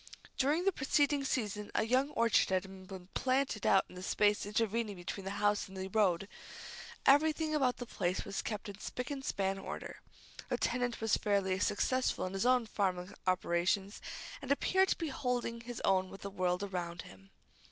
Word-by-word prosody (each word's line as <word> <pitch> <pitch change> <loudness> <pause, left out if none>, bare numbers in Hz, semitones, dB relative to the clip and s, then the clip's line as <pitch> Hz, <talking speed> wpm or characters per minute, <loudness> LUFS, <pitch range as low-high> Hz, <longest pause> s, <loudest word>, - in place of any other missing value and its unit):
During 295 +7 +2
the 390 - +5
preceding 285 -1 +2
season 210 -6 -2
a - - +3
young 255 +5 +2
orchard 230 -2 +3
had 190 0 -2
been 185 -1 -9
planted 260 -4 +1
out 195 - +5
in - - -15
the 180 - -8
space 205 +2 +2
intervening 220 0 0
between 185 +2 -6
the - - -2
house 205 0 +2
and 190 0 -11
the 190 0 -4
road. 195 -3 +2 0.8
Everything 310 +2 +4
about 265 -5 +2
the 245 - -5
place 185 -5 -2
was 200 -1 -3
kept 210 -1 -4
in 200 0 -8
spick 250 +4 -5
and 275 -1 -4
span 195 -5 -1
order. - - -7 0.5
The - - 0
tenant 245 -1 -1
was 225 -1 +3
fairly 195 -2 +1
successful 255 +6 +1
in 185 - -4
his 195 +5 +1 0.2
farming 185 -2 -1
operations, 185 +2 +1 0.4
and 275 - -4
appeared 380 +6 +3
to - - +2
be 325 -3 -2
holding 250 -3 -2
his 240 0 -6
own 190 -1 +3
with 195 - -11
the 200 - -5
world 180 0 0
around 175 -3 -4
him. 95 0 -15
205 Hz, 180 wpm, -33 LUFS, 190-255 Hz, 0.8 s, the